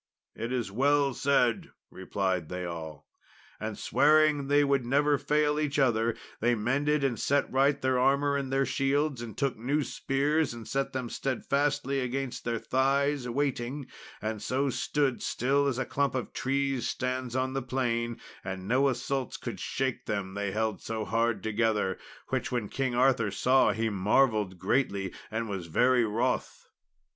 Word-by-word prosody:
"It 115 +2 -5
is 120 -6 -2
well 140 +4 +2
said," 125 -4 +1 0.2
replied 95 -3 -2
they 90 0 -4
all. 80 -4 -7 0.5
And - - -4
swearing 150 -1 +3
they 145 +1 +4
would 140 -2 +2
never 145 +3 +2
fail 150 0 +1
each 150 -1 -1
other, 115 -4 +2 0.2
they 120 +2 +2
mended 140 +6 +1
and 125 -5 0
set 145 +1 +1
right 135 +2 +3
their 130 -2 +1
armour 140 +2 +3
and 135 -2 -2
their 135 0 +2
shields, 135 0 0
and 115 -2 -8
took 140 -2 0
new 140 +7 0
spears 140 +1 0
and 115 -2 -9
set 135 0 -1
them 130 -2 -3
steadfastly 140 +2 -1
against 130 0 -3
their 115 -1 0
thighs, 135 +2 +1
waiting, 135 +1 -2 0.4
and 110 -1 -3
so 135 +5 0
stood 140 -1 0
still 140 +3 +1
as 130 -3 0
a 130 - -1
clump 140 -1 0
of 130 - -3
trees 135 -1 -1
stands 130 -1 -3
on 130 0 0
the 135 - -1
plain; 120 -2 -1 0.2
and 95 0 -5
no 135 +4 +3
assaults 130 +1 -2
could - - -6
shake 130 -1 -2
them, 100 -3 -2
they 100 0 -2
held 110 +1 -1
so 110 -1 -3
hard 115 +1 0
together; 110 -3 0 0.3
which - - -1
when 120 -5 -2
King 130 -3 -1
Arthur 125 -4 +3
saw 130 +6 +3
he 115 0 -1
marvelled 105 -1 +2
greatly, 100 -4 0 0.2
and 115 +1 -2
was 95 -5 -4
very 125 +8 +3
wroth. 115 +4 -2
130 Hz, 160 wpm, -29 LUFS, 115-140 Hz, 0.5 s, they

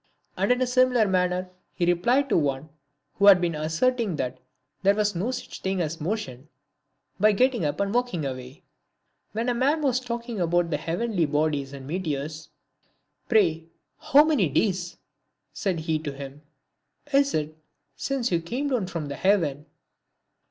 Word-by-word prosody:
And - - +1
in 250 - +3
a - - +2
similar 250 -3 +3
manner 180 -1 0 0.2
he 175 - 0
replied 235 +11 +2
to - - +2
one 145 -1 0 0.5
who 200 - +5
had 195 -3 +9
been 175 -1 0
asserting 175 +7 0
that 130 -4 -3 0.4
there 200 +1 +4
was 210 -1 +1
no 190 +8 -1
such 255 -1 -6
thing 190 0 -1
as 160 -1 -3
motion, 155 - -4 0.7
by 210 +2 +5
getting 250 -1 +2
up 145 - -2
and 200 +1 0
walking 245 -11 0
away. 130 +1 -7 0.7
When 225 +3 -2
a 245 - +2
man 280 +6 +1
was 255 -3 +2
talking 235 -4 -5
about 175 0 +1
the 150 - +1
heavenly 175 +1 -1
bodies 145 -2 0
and 135 -1 -9
meteors, 155 -2 -4 0.4
" - - -45
Pray 165 -8 +2 0.3
how 290 +2 +6
many 295 - +2
days," 180 +2 0 0.6
said 185 -6 -2
he 160 0 -1
to 150 -2 -5
him, 140 +1 -9 0.3
" 290 - -27
is 280 0 +3
it 155 0 -2 0.4
since 255 - -2
you 170 -1 +1
came 250 - -3
down 240 -9 0
from 165 -5 -4
heaven 150 -2 0
180 Hz, 165 wpm, -25 LUFS, 155-235 Hz, 0.7 s, had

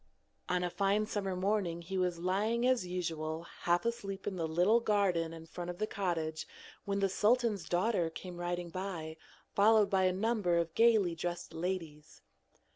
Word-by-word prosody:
On 180 0 +1
a 175 - -1
fine 200 +3 +1
summer 200 -3 -2
morning 185 -3 0
he 190 +3 -5
was 180 -2 0
lying 205 +7 0
as 255 -8 +2
usual 165 -3 -3 0.2
half 175 +4 +1
asleep 200 -5 -3
in 200 - -2
the 165 -3 -1
little 180 +8 +4
garden 195 -7 +1
in 165 0 -9
front 175 +2 -6
of 175 - -5
the 215 - 0
cottage 165 -6 -2 0.4
when 200 0 -1
the 195 - +4
sultan's 210 -2 +1
daughter 180 -1 +1
came 175 +2 -8
riding 175 0 -3
by, 170 -4 -5 0.4
followed 210 0 +5
by 190 -1 +3
a 185 - +4
number 195 -3 +1
of 170 -1 -1
gaily 220 -6 +4
dressed 175 0 -4
ladies. 165 -3 -5
185 Hz, 170 wpm, -33 LUFS, 170-205 Hz, 0.4 s, followed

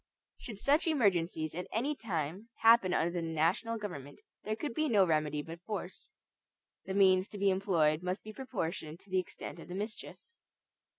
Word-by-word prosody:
Should 220 -4 -8
such 290 - +2
emergencies 175 - +1
at 180 +2 -5
any 275 +7 0
time 185 - -4
happen 225 -5 +6
under 170 -1 +1
the 175 -1 -2
national 165 +8 0
government, 145 -10 -7 0.2
there 215 +1 -2
could 290 +2 -4
be 310 +3 0
no 200 -4 +5
remedy 150 -3 0
but 165 +2 -9
force. 190 -2 -6 0.8
The 190 0 -3
means 190 -1 +5
to 210 - -9
be 200 0 +3
employed 170 -5 +2
must 180 +2 -3
be 215 - -8
proportioned 175 - -4
to 200 - -21
the 185 - +3
extent 175 -1 -7
of - - -10
the 180 - -6
mischief. 210 +3 -5
185 Hz, 175 wpm, -32 LUFS, 165-215 Hz, 0.8 s, happen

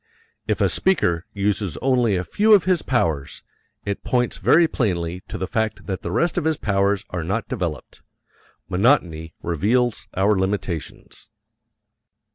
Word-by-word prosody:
If - - 0
a - - +4
speaker 90 - +1
uses 100 -5 -1
only 125 -6 +2
a 90 - -1
few 215 - +4
of 195 - +3
his 185 -3 +2
powers, 80 - -1 0.4
it 100 0 -3
points 125 -1 0
very 170 +1 +5
plainly 90 - -2
to - - -6
the 95 - -2
fact 110 +3 -2
that 95 -2 -4
the - - -4
rest 170 0 +1
of - - -5
his 160 -2 +1
powers 100 -1 0
are 90 -2 -3
not 100 +5 -2
developed. 90 - -5 0.7
Monotony 90 - +1
reveals 110 +8 0
our 100 +2 +3
limitations. 95 -4 -4
100 Hz, 145 wpm, -22 LUFS, 90-125 Hz, 0.7 s, very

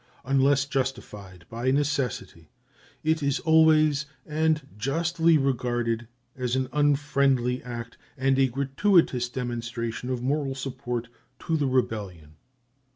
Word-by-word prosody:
Unless 135 +1 +3
justified 105 - -4
by 120 +3 -2
necessity, 135 - -1 0.5
it 160 +1 +1
is 140 0 0
always, 155 -2 +4 0.2
and 155 -2 0
justly, 165 +7 +2
regarded 120 -4 -1 0.3
as 125 -1 -1
an 130 -1 -1
unfriendly 140 -4 +2
act 120 -1 -8 0.2
and 135 0 +2
a 135 - +5
gratuitous 135 - +2
demonstration 120 -1 -4
of 125 -1 -2
moral 135 0 -1
support 125 -3 -4 0.3
to 165 - -1
the 145 -3 +1
rebellion. 100 - -2
135 Hz, 110 wpm, -26 LUFS, 120-145 Hz, 0.5 s, a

